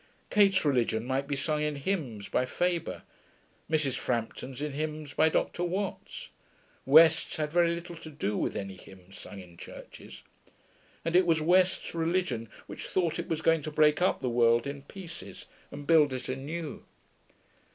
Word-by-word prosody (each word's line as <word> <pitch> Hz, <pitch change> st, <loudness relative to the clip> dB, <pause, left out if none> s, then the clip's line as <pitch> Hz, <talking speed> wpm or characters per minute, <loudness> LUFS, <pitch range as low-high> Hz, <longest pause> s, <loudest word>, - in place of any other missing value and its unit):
Kate's 195 Hz, -4 st, +4 dB
religion 120 Hz, -5 st, +1 dB
might 135 Hz, +2 st, -1 dB
be 145 Hz, -, -1 dB
sung 150 Hz, +2 st, -1 dB
in 150 Hz, -1 st, -1 dB
hymns 140 Hz, -, -3 dB
by -, -, +1 dB
Faber; 175 Hz, +6 st, -2 dB, 0.7 s
Mrs. 150 Hz, -5 st, +1 dB
Frampton's 125 Hz, +2 st, -3 dB
in 150 Hz, 0 st, -3 dB
hymns 150 Hz, 0 st, -4 dB
by 160 Hz, -, +4 dB
Dr. 175 Hz, -, -1 dB
Watts; 190 Hz, +3 st, -4 dB, 0.6 s
West's 160 Hz, +3 st, +6 dB
had 150 Hz, -1 st, -2 dB
very 170 Hz, 0 st, +3 dB
little 170 Hz, 0 st, -8 dB
to 160 Hz, -, -10 dB
do 105 Hz, -9 st, -2 dB
with -, -, -1 dB
any 95 Hz, -1 st, -5 dB
hymns 95 Hz, 0 st, -15 dB
sung 100 Hz, +1 st, -9 dB
in 90 Hz, -2 st, -13 dB
churches. -, -, -11 dB, 0.8 s
And 165 Hz, +1 st, 0 dB
it 180 Hz, 0 st, +5 dB
was 165 Hz, -1 st, +3 dB
West's 180 Hz, +3 st, +2 dB
religion 165 Hz, -, -1 dB, 0.2 s
which -, -, -8 dB
thought 170 Hz, -4 st, 0 dB
it -, -, -4 dB
was 160 Hz, 0 st, -2 dB
going 165 Hz, -1 st, +4 dB
to 155 Hz, -, -5 dB
break 150 Hz, +1 st, +3 dB
up 185 Hz, -, +2 dB
the -, -, -1 dB
world 115 Hz, -1 st, +3 dB
in 140 Hz, 0 st, -5 dB
pieces 150 Hz, -, -10 dB, 0.2 s
and 145 Hz, 0 st, -8 dB
build 150 Hz, -3 st, +5 dB
it 130 Hz, -, -5 dB
anew. 145 Hz, +5 st, -5 dB
150 Hz, 165 wpm, -29 LUFS, 130-165 Hz, 0.8 s, West's